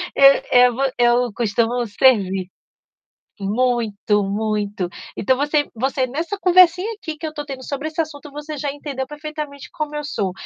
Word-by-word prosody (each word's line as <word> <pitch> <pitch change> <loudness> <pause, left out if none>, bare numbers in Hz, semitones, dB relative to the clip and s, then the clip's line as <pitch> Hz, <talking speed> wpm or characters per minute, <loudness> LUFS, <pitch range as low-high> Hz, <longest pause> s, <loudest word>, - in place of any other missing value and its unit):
Eu 275 0 +8 0.2
eu 250 -1 +6
vo 270 +1 0
eu 240 -1 +3
costumo 235 +2 0
servir. 195 -5 +2 0.9
Muito, 210 -1 0
muito. 205 -1 -2 0.3
Então 260 +6 +2
você 290 +1 +1
você 260 +2 0
nessa 325 +10 -3
conversinha 365 +1 +5
aqui 320 -6 -6
que 315 - -5
eu 305 - -7
tô 295 -1 -5
tendo 270 -2 -7
sobre 280 +3 -4
esse 315 - -9
assunto, 295 -2 -8
você 295 +1 -7
já 285 0 -2
entendeu 280 -2 -5
perfeitamente 295 -1 -7
como 300 -1 -4
eu 295 - -3
sou. 200 -10 -2
270 Hz, 160 wpm, -21 LUFS, 225-300 Hz, 0.9 s, Eu